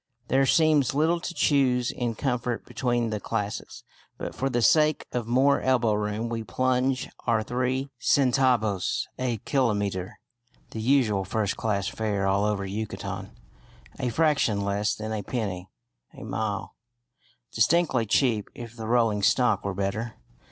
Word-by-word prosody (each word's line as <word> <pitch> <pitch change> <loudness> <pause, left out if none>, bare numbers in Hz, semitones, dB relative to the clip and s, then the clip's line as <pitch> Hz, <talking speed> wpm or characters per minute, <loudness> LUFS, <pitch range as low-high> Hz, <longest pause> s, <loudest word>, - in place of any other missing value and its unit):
There 135 +1 +3
seems 150 -5 +3
little 160 +4 +2
to 175 - -5
choose 130 -7 +2
in 120 -2 -3
comfort 125 -1 -2
between 120 -3 -1
the 105 - -2
classes, 105 -1 -4 0.3
but - - -5
for 135 - -1
the 120 -2 0
sake 155 +2 +4
of 120 -2 -3
more 135 +4 +3
elbow 125 -4 +2
room 105 +2 -2
we 115 -1 -3
"plunge" 130 +5 0 0.2
our 115 -2 +2
three 130 +4 -2
centavos 125 -7 +2
a 125 -3 -1
kilometre 105 -8 0 0.5
(the 110 - -5
usual 115 -6 +2
first 100 +1 -1
class 100 -3 -1
fare 100 -2 -1
all 100 +1 +2
over 105 -2 -1
Yucatan), 105 +3 -5 0.7
a 125 -2 0
fraction 140 -7 +2
less 100 +1 0
than 110 0 -5
a 105 - -2
penny 100 -5 -4 0.5
a - - -10
mile, 100 -1 -3 0.8
distinctly 130 -1 +2
cheap 110 -2 +1
if 120 -1 -9
the 110 -1 -6
rolling 115 -3 +2
stock 125 +5 +3
were 100 -1 -3
better. 105 +4 -3
115 Hz, 145 wpm, -26 LUFS, 105-130 Hz, 0.8 s, sake